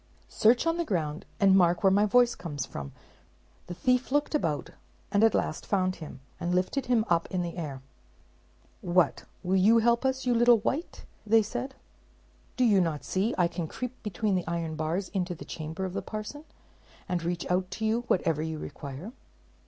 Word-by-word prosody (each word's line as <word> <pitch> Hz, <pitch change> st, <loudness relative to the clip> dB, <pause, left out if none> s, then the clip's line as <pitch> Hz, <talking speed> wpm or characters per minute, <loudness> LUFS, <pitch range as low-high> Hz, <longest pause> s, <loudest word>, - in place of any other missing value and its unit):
"Search 235 Hz, +5 st, +3 dB
on 330 Hz, 0 st, +1 dB
the 340 Hz, -, 0 dB
ground, 165 Hz, -, -2 dB
and 195 Hz, -1 st, +5 dB
mark 175 Hz, +1 st, +3 dB
where 195 Hz, -, +6 dB
my 205 Hz, +2 st, +4 dB
voice 245 Hz, +3 st, +4 dB
comes 145 Hz, -7 st, -5 dB
from," 70 Hz, -, -7 dB
replied -, -, -17 dB
he. -, -, -31 dB
The 175 Hz, -, -5 dB
thief 250 Hz, +5 st, +1 dB
looked 290 Hz, +2 st, +1 dB
about, 160 Hz, -, -1 dB, 0.4 s
and 205 Hz, +1 st, +3 dB
at 225 Hz, -, +5 dB
last -, -, -1 dB
found 185 Hz, -2 st, +1 dB
him; 150 Hz, -5 st, -9 dB, 0.2 s
and 175 Hz, +1 st, -1 dB
lifted 185 Hz, +10 st, 0 dB
him 235 Hz, -3 st, +2 dB
up 170 Hz, -1 st, +2 dB
in 180 Hz, -1 st, -1 dB
the 170 Hz, -1 st, -5 dB
air. 145 Hz, -6 st, -5 dB, 1.0 s
"What, 175 Hz, -4 st, +2 dB, 0.2 s
will 185 Hz, +2 st, +2 dB
you 215 Hz, +5 st, +5 dB
help 235 Hz, +2 st, +3 dB
us, 265 Hz, 0 st, 0 dB
you 250 Hz, -, +3 dB
little 240 Hz, 0 st, +6 dB
wight?" 275 Hz, -, -3 dB, 0.4 s
said 240 Hz, +5 st, -4 dB
they. 265 Hz, -, -22 dB, 0.8 s
"Do 255 Hz, -, +3 dB
you 205 Hz, -5 st, +5 dB
not 160 Hz, -4 st, -1 dB
see 200 Hz, +6 st, 0 dB
I 175 Hz, -2 st, +4 dB
can 170 Hz, -1 st, -4 dB
creep 250 Hz, +8 st, -5 dB
between 210 Hz, 0 st, -1 dB
the 180 Hz, -3 st, -1 dB
iron 165 Hz, -1 st, -2 dB
bars 165 Hz, +5 st, -2 dB
into 180 Hz, -2 st, -2 dB
the -, -, -10 dB
chamber 160 Hz, +4 st, -5 dB
of 185 Hz, -, -5 dB
the -, -, -2 dB
parson, 215 Hz, +8 st, -7 dB, 0.6 s
and 180 Hz, -1 st, -1 dB
reach 170 Hz, +1 st, -2 dB
out 180 Hz, 0 st, +1 dB
to 220 Hz, +4 st, -4 dB
you 225 Hz, +2 st, +1 dB
whatever 165 Hz, -4 st, +1 dB
you 160 Hz, 0 st, -3 dB
require?" 145 Hz, -, -7 dB
185 Hz, 195 wpm, -28 LUFS, 170-230 Hz, 1.0 s, where